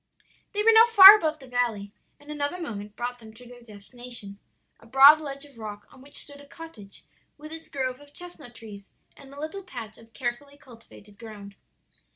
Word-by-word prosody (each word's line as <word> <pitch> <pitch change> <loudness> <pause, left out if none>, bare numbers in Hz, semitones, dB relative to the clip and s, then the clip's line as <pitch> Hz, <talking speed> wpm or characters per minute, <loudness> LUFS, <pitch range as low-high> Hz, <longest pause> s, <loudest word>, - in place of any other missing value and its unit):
"They 420 0 -2
were 455 - +5
now 450 +1 +6
far 405 -3 +10
above 315 -6 -2
the 275 - -16
valley, 235 -5 -3 0.3
and 290 +1 -13
another 295 +4 -4
moment 210 - -8
brought 245 +1 -6
them 220 -1 -16
to 250 - -16
their 245 0 -15
destination 215 -1 -5 0.4
a 225 - -20
broad 275 +5 +6
ledge 280 -1 -8
of 275 -5 -19
rock 210 -1 -9
on 260 - -18
which 280 +2 -7
stood 285 -1 -2
a 285 - -18
cottage 280 -11 -13 0.3
with 305 +1 -12
its 325 0 -5
grove 260 -3 -4
of 290 0 -19
chestnut 305 -8 -10
trees, 210 -4 -13 0.3
and 275 -1 -16
a 280 - -13
little 315 +6 -7
patch 235 - -11
of 225 0 -20
carefully 280 +3 -6
cultivated 230 -5 -18
ground. 205 -3 -12
255 Hz, 190 wpm, -25 LUFS, 225-295 Hz, 0.4 s, far